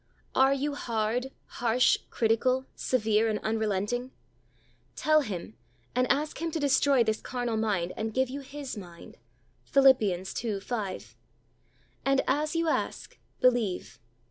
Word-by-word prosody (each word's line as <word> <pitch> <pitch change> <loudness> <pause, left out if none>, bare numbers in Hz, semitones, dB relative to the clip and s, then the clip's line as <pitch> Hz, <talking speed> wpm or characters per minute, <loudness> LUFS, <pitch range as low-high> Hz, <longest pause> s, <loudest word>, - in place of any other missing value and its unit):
Are 265 +1 +5
you 285 +2 -2
hard, 235 0 -1 0.2
harsh, 240 +1 +2
critical, 250 +3 +1
severe 220 -3 +1
and 215 - 0
unrelenting? 220 +3 -1 0.9
Tell 310 0 +3
Him 205 -4 -6 0.4
and 250 0 +2
ask 300 +3 -1
Him 335 - -1
to 320 - -3
destroy 280 -2 +4
this 220 -1 -1
carnal 245 -2 -3
mind 205 -6 0
and 220 0 -3
give 260 +3 +1
you 270 +3 -5
His 275 -1 -7
mind. 175 -5 -11 0.5
(Phil. 275 -1 +6 0.3
2: 210 +1 -3
5.) 200 -2 -5 0.9
And 275 0 +3
as 300 +4 0
you 330 0 +1
ask, - - -2 0.2
believe. 200 - +1
245 Hz, 130 wpm, -28 LUFS, 215-270 Hz, 0.9 s, Phil